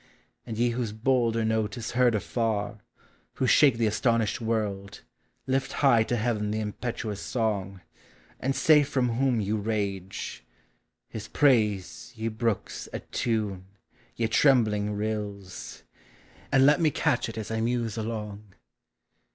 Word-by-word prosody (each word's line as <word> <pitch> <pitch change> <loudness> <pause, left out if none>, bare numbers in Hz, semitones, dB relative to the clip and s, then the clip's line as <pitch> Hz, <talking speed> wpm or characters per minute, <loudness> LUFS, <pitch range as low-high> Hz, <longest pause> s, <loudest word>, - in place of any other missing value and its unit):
And 110 - -5
ye 120 +1 +2
whose 120 -3 -2
bolder 115 -1 +1
note 110 -1 0
is 115 -1 -4
heard 120 -2 +3
afar, 110 0 -1 0.6
Who 130 - 0
shake 135 -1 +5
the 115 - +1
astonished 110 0 +1
world, 105 -3 -2 0.4
lift 135 +1 -1
high 130 -5 +4
to 120 - -1
Heaven 110 -2 -1
The 110 +1 -1
impetuous 110 -1 -4
song, 100 -5 -2 0.6
and 135 +1 -1
say 155 -2 +6
from 130 -3 0
who* 130 +3 +1 0.2
>'•' 105 - -3
rage..,,,. 100 - -3 0.6
His 110 -1 -7
praise, 110 -9 +1
ye 115 0 -2
brooks, 110 -1 -2
attune, 105 -5 -2 0.5
ye 115 - 0
trembling 110 -5 +3
rills, 105 -3 -5 0.7
And 135 0 +5
let 150 +4 +5
me 160 - +4
catch 120 -4 0
ii 110 - -6
us 110 - -6
l 110 0 -1
muse 115 -2 -1
along. 105 -3 -5
110 Hz, 135 wpm, -27 LUFS, 105-120 Hz, 0.7 s, say